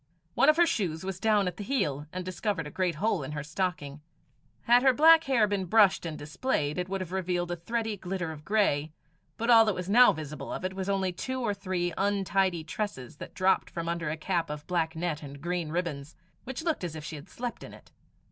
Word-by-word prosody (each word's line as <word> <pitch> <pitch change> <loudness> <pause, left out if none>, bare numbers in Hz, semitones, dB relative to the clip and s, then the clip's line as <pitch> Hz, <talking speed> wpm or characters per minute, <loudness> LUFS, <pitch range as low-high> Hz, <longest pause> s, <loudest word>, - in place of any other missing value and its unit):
One 275 - +4
of 310 - +5
her 345 - +6
shoes 185 - -1
was 190 -1 -4
down 210 -3 +3
at 180 - -4
the 205 - -5
heel, 150 - -1
and 185 0 -5
discovered 185 -2 -2
a 150 - -7
great 180 -1 -1
hole 200 +1 0
in 140 +2 -6
her 150 -1 -4
stocking. 150 -3 -3 0.6
Had 240 +1 +5
her 265 0 +5
black 325 +4 +7
hair 255 -5 +3
been 200 -2 -1
brushed 195 -2 +4
and 155 -2 -5
displayed, 150 - -2
it 180 +1 -3
would 195 0 -2
have 180 -2 -6
revealed 180 -2 -1
a - - -1
thready 220 +5 -3
glitter 180 -2 -4
of 150 -1 -10
grey, 160 -6 +1 0.4
but 230 +2 +1
all 225 -1 +9
that 215 -3 +1
was 180 +2 -4
now 245 +3 +8
visible 150 0 -6
of - - -4
it 185 - -2
was 190 0 -4
only 190 -2 0
two 260 +8 -4
or 220 -4 0
three 185 -3 -2
untidy 195 -3 +1
tresses 155 - -5
that - - -10
dropped 190 +1 +2
from 165 -1 -5
under 170 -2 -2
a 155 - -3
cap 170 0 -1
of 150 0 -6
black 165 -2 -1
net 160 -2 -2
and 140 -1 -9
green 175 +1 -2
ribbons, 155 -4 -3 0.3
which 265 +4 -5
looked 325 - -1
as 170 -3 -4
if 155 - -7
she 155 - -6
had 150 +4 -11
slept 245 -1 -6
in - - -9
it. - - -16
185 Hz, 230 wpm, -28 LUFS, 160-210 Hz, 0.6 s, all